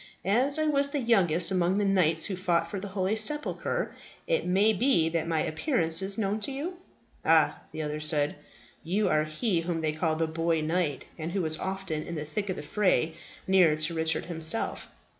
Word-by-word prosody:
As 255 +9 +4
I 310 - +1
was 280 -2 +2
the 285 - -2
youngest 180 - +2
among 185 0 +1
the 205 - +1
knights 170 -5 +2
who 195 - -3
fought 175 -2 0
for 200 - -4
the 200 - -6
holy 190 +1 -1
sepulchre, 300 - +1 0.3
it - - -1
may 200 +4 +3
be 210 -7 +2
that 165 -1 -2
my 160 -2 0
appearance 165 - +2
is 195 +1 0
known 210 0 -1
to 215 - -4
you?" 320 +7 -5 0.5
"Ah," - - +3
the 155 - -5
other 150 0 -4
said, 150 -1 +1 0.5
"you 195 +6 0
are 155 0 +2
he 165 +4 -1
whom 165 -1 -3
they 155 -1 0
called 155 0 -1
the 165 - +1
Boy 165 +1 -1
Knight, 155 -3 -1
and 160 +2 -4
who 195 -2 -1
was 155 0 -1
often 190 -5 -4
in 170 - -7
the 150 -1 -4
thick 195 +7 -4
of 185 - -1
the - - -7
fray, 165 -2 +1 0.3
near 185 -5 +4
to 155 +2 -1
Richard 160 0 -1
himself. 165 +5 0
180 Hz, 200 wpm, -28 LUFS, 160-205 Hz, 0.5 s, As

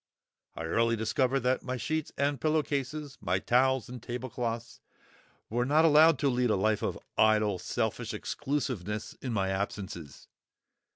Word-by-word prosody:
I - - -5
early 115 +8 +2
discovered 125 +4 +1
that 125 +2 +1
my 130 0 -3
sheets 155 +4 -2
and 140 -2 0
pillow 155 0 +2
cases, 145 +1 -4
my - - +1
towels 130 0 +2
and 125 -1 -8
tablecloths, 120 -1 -4 0.7
were 120 +3 0
not 150 +5 +4
allowed 160 +1 +6
to 145 - +3
lead 125 -2 +2
a - - +3
life 105 +2 +1
of - - -2 0.2
idle, 105 -3 +4
selfish - - -2
exclusiveness 120 -8 -3
in 130 - -3
my 95 -4 0
absences. 95 -6 -5
125 Hz, 150 wpm, -30 LUFS, 110-140 Hz, 0.7 s, allowed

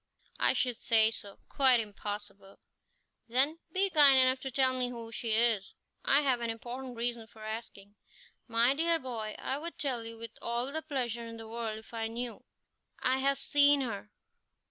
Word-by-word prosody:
"I - - +4
should 250 -2 -1
say 225 -2 +4
so 200 -3 -8
quite 265 -4 +5
impossible." 205 -2 -6 0.7
"Then, 270 +7 +2
be 385 +3 +2
kind 285 -4 +7
enough 260 0 +4
to 265 - -5
tell 260 0 +2
me 250 -1 -1
who 230 -2 -8
she 230 0 -2
is. 220 -4 +2 0.3
I - - +4
have 260 -4 +1
an 235 - -2
important 245 +3 -6
reason 235 -1 -2
for 220 -1 -14
asking." 215 -2 -7 0.5
"My 235 +2 +3
dear 330 +3 +2
boy, 230 -7 -5
I 270 - -3
would 335 +2 -7
tell 255 -5 -1
you 230 0 -8
with 230 0 -10
all 240 +3 -2
the 315 +2 -2
pleasure 245 -6 -3
in 230 0 -8
the 225 0 -9
world 225 -1 -4
if 220 +2 -14
I 225 -1 -2
knew." 235 +1 -6 0.5
"I 260 +1 +2
have 275 +1 +2
seen 285 0 +4
her." 210 -5 -5
240 Hz, 180 wpm, -31 LUFS, 225-265 Hz, 0.7 s, kind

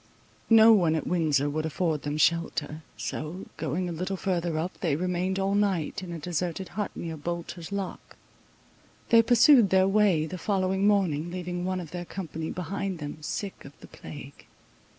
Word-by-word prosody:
No 225 0 +8
one 170 -6 +3
at 155 - -2
Windsor 155 -5 +1
would 155 +2 -2
afford 160 -1 -1
them 145 +1 -3
shelter; 160 -1 0 0.2
so, 165 +5 -5
going 165 +4 -2
a - - -3
little 185 +4 -3
further 175 -4 -1
up, 170 +4 -3
they 160 -6 +1
remained 180 +3 -1
all 195 0 0
night 195 -3 0
in 180 -2 -7
a 170 - -4
deserted 175 +2 -3
hut 210 0 -3
near 165 -1 -5
Bolter's 170 +2 -5
lock. 200 -2 -5 0.9
They 230 -1 +7
pursued 240 0 +6
their 190 0 +4
way 195 -6 +3
the 180 +3 -6
following 190 +1 +1
morning, 175 -6 +2
leaving 180 0 -4
one 185 0 -1
of 165 -4 -8
their 175 0 -5
company 165 -3 -5
behind 190 +1 -3
them, 150 0 -7
sick 195 +6 -5
of 140 - -14
the - - -12
plague. 140 -2 -11
175 Hz, 170 wpm, -27 LUFS, 160-190 Hz, 0.9 s, No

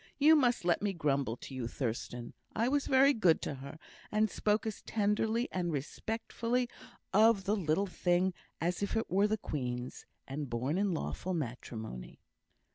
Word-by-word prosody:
You 305 +2 +7
must 245 - +2
let 175 - +3
me 205 -1 0
grumble 140 -8 0
to 135 - -10
you, 130 -3 -3
Thurstan. 120 -1 -4 0.2
I 230 +2 +2
was 285 +2 +1
very 270 +1 +6
good 185 -9 +4
to - - -2
her, 140 +3 -8 0.3
and 215 0 +2
spoke 210 +1 +1
as 220 -2 -4
tenderly 220 +3 +1
and 175 -2 -1
respectfully 230 - -2 0.5
of 215 -1 +5
the 205 +3 +1
little 185 0 +1
thing 180 0 +1 0.3
as 175 +3 -1
if 200 +2 0
it 225 - -2
were 200 +3 +4
the 215 +1 0
Queen's, 125 - -4 0.2
and 140 0 -4
born 130 +9 -1
in 200 -1 +2
lawful 185 +3 -3
matrimony." 115 - -6
185 Hz, 165 wpm, -32 LUFS, 140-220 Hz, 0.5 s, You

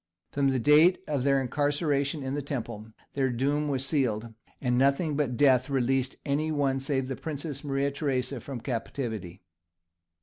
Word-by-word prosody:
From 140 -1 +1
the 135 -1 +2
date 150 +8 +6
of 145 -3 0
their 140 +1 +3
incarceration 145 +2 0
in 130 0 -3
the 145 - -1
Temple 115 -6 -5 0.3
their 135 -2 +1
doom 140 +5 0
was 135 -2 -1
sealed, 115 -6 0 0.3
and 125 -2 0
nothing 140 +4 +2
but 135 -5 -1
death 130 -1 +4
released 135 -1 +1
any 155 +2 0
one 140 -3 +1
save 135 -1 -1
the 135 - -3
Princess 145 0 -5
Marie 140 0 0
Theresa 140 -2 -2
from 130 -1 -7
captivity. 115 -7 -4
135 Hz, 160 wpm, -28 LUFS, 125-145 Hz, 0.3 s, date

